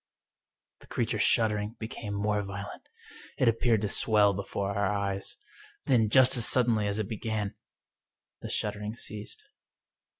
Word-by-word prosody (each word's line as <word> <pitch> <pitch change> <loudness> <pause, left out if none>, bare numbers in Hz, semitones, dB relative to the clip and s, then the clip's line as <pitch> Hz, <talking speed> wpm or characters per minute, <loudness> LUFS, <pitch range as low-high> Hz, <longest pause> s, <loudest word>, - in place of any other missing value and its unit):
The - - -17
creature's - - -1
shuddering 105 -1 +1
became 110 -2 -6
more 105 +1 0
violent. 100 0 -8 0.5
It 130 - +2
ap 115 0 +2
peared 115 -4 +2
to 105 - 0
swell 105 0 +4
before 100 +1 -3
our 100 -1 +1
eyes. 100 -1 -3 0.5
Then, 115 -5 +3
just 130 +3 +5
as 115 - +5
suddenly 115 -4 +3
as 100 0 -2
it 110 -3 -2
began, 110 -2 -3 0.9
the - - -6
shuddering 105 +1 -3
ceased. 105 -3 -8
105 Hz, 140 wpm, -28 LUFS, 100-110 Hz, 0.9 s, just